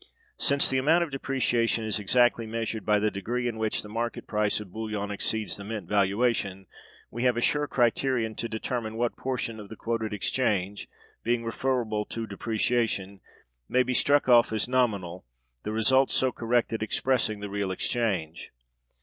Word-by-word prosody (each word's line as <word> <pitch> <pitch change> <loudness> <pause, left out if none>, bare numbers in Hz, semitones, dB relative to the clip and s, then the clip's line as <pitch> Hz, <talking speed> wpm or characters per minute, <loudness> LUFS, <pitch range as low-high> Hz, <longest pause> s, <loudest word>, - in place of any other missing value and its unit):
Since 140 0 +3
the 130 - +1
amount 160 +6 +4
of 165 - -5
depreciation 120 -4 0
is 110 -1 0
exactly 120 +2 +3
measured 110 -1 -3
by 105 0 +5
the 105 +1 +1
degree 120 +6 -2
in 115 -2 -3
which 110 -1 -1
the - - -9
market 115 +2 -3
price 105 -1 0
of 105 -4 -9
bullion 110 -2 -3
exceeds 110 +1 -1
the 100 - -8
mint 105 -3 -5
valuation, 100 -1 +1 0.5
we 120 - -4
have 125 -2 +3
a - - 0
sure 145 +3 +1
criterion 120 -2 +1
to 115 - -3
determine 110 0 -3
what 120 0 0
portion 125 -4 -3
of 105 -2 -10
the 110 - -8
quoted 115 -1 -2
exchange, 105 -2 -1 0.3
being 120 0 0
referable 115 -3 -1
to 115 -1 -5
depreciation, 110 -2 -1 0.5
may 130 0 +4
be 125 +1 -1
struck 145 +2 +3
off 120 -2 +6
as 110 0 0
nominal, 100 -9 0 0.4
the 105 - -4
result 130 +5 +3
so 130 -1 +2
corrected 115 -1 0
expressing 110 -1 0
the 105 - -5
real 100 -1 -2
exchange. 95 -5 -2
115 Hz, 165 wpm, -27 LUFS, 105-125 Hz, 0.5 s, off